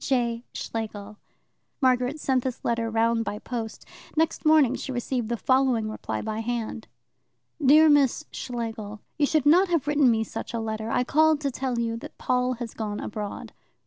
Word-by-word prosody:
J. 240 -3 0
Schlegel 210 -2 -5 0.6
Margaret 255 +1 +2
sent 260 -3 +1
this 255 -2 -4
letter 230 -1 0
round 230 +1 +2
by 210 - -4
post. 225 -1 -6 0.3
Next 320 -1 +1
morning 305 -5 +5
she 265 - -5
received 245 -2 -2
the 235 - -1
following 255 -2 +2
reply - - -4
by 220 0 -3
hand: 225 -1 -3 0.8
Dear 305 +4 +7
Miss 290 0 +3
Schlegel, 225 -4 -5 0.2
You 290 - +4
should 310 -2 +1
not 355 +6 +6
have 335 -6 0
written 295 -3 +4
me 225 -1 +2
such 230 - -6
a - - -1
letter. 220 0 -3
I 250 - +1
called 310 +3 +3
to 280 -2 -1
tell 255 -1 -2
you 230 -1 -1
that - - -10
Paul 250 0 +1
has 240 -2 -6
gone 210 -2 -4
abroad. 210 -1 -6
240 Hz, 175 wpm, -26 LUFS, 225-270 Hz, 0.8 s, Dear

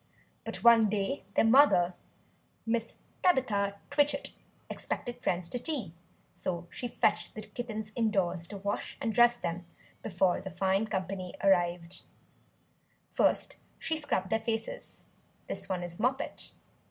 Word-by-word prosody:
But - - -4
one 230 -2 +7
day 210 +7 -1
their - - +5
mother 225 -8 +6 0.7
Mrs. 230 0 0 0.3
Tabitha 205 - +2 0.2
Twitchit 285 -1 +2 0.4
expected 245 0 -5
friends 175 -5 0
to 245 - -2
tea; 245 - -2 0.4
so 175 -2 -3
she 245 - -4
fetched - - 0
the 215 - -6
kittens 220 -3 -5
indoors, 195 -7 +1
to 200 - -7
wash 200 +1 -3
and 225 - -1
dress 240 0 +6
them, 175 -3 -3 0.4
before 185 -3 +1
the 190 - -6
fine 195 +3 +1
company 185 -2 -3
arrived. 175 -3 +2 1.1
First - - +2 0.2
she 320 - -1
scrubbed 220 -11 -1
their 220 - +3
faces 230 - -4 0.4
(this 195 0 -4
one 180 -2 -1
is 175 -1 -7
Moppet). 265 +4 -1
210 Hz, 130 wpm, -31 LUFS, 185-240 Hz, 1.1 s, one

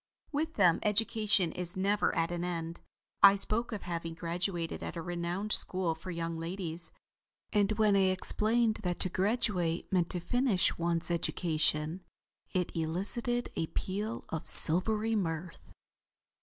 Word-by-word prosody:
With 315 +2 -2
them 175 -4 +4
education 210 -4 +2
is 180 +1 -4
never 200 +2 +1
at 165 +1 0
an 175 0 -3
end. 170 -1 -4 0.4
I 200 0 +9
spoke 220 +4 +1
of 210 -4 -5
having 165 -1 -5
graduated 170 0 -3
at - - -6
a 170 - -4
renowned 175 +4 -3
school 185 -5 +1
for 160 +3 -10
young 165 -1 -4
ladies, 170 -1 -4 0.6
and 205 0 +2
when 215 -1 +3
I 195 -1 +4
explained 215 +4 +1
that 180 -3 -3
to 185 - -1
graduate 185 -4 -1
meant 175 -2 +2
to 180 - -3
finish 225 +2 +1
one's 170 0 -1
education, 160 0 -1 0.5
it 180 -2 -2
elicited 200 +9 -2
a 160 - -2
peal 210 +7 -4
of 160 - -5
silvery 215 +7 +6
mirth. 165 -3 -4
180 Hz, 140 wpm, -31 LUFS, 170-210 Hz, 0.6 s, I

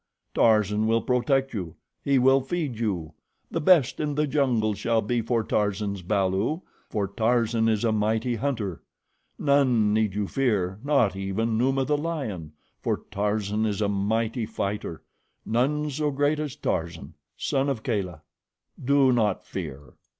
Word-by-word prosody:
Tarzan 105 -1 +3
will 115 0 +2
protect 135 +2 +1
you. 90 -7 -5 0.3
He 140 -1 +3
will 135 +1 +5
feed 135 -4 -3
you. 90 -8 -2 0.4
The - - -1
best 150 -5 +4
in 150 -2 -1
the 150 +1 +2
jungle 130 -7 +1
shall 115 +2 0
be 120 +3 0
for 115 0 0
Tarzan's 100 -2 -1
balu, 100 - 0 0.3
for 105 -3 -1
Tarzan 115 +2 +1
is 110 -1 +1
a 115 - +2
mighty 110 +3 +1
hunter. 110 - -2 0.6
None 130 -7 +3
need 110 -3 +1
you 105 -1 -1
fear, 100 -8 0
not 140 -9 +2
even 100 +4 -1
Numa, 135 +3 +1
the 150 +1 +1
lion, 130 - -4 0.3
for - - -1
Tarzan 105 +1 -1
is 100 -2 -2
a 105 -1 +1
mighty 110 +3 0
fighter. 100 -5 -4 0.4
None 145 +6 0
so 150 +2 0
great 145 +2 +1
as 150 -4 -3
Tarzan, - - -3 0.2
son 135 +1 0
of 120 -6 -3
Kala. 90 - -2 0.6
Do 135 0 +4
not 110 -5 +1
fear." 70 +2 -7
115 Hz, 150 wpm, -26 LUFS, 105-135 Hz, 0.6 s, will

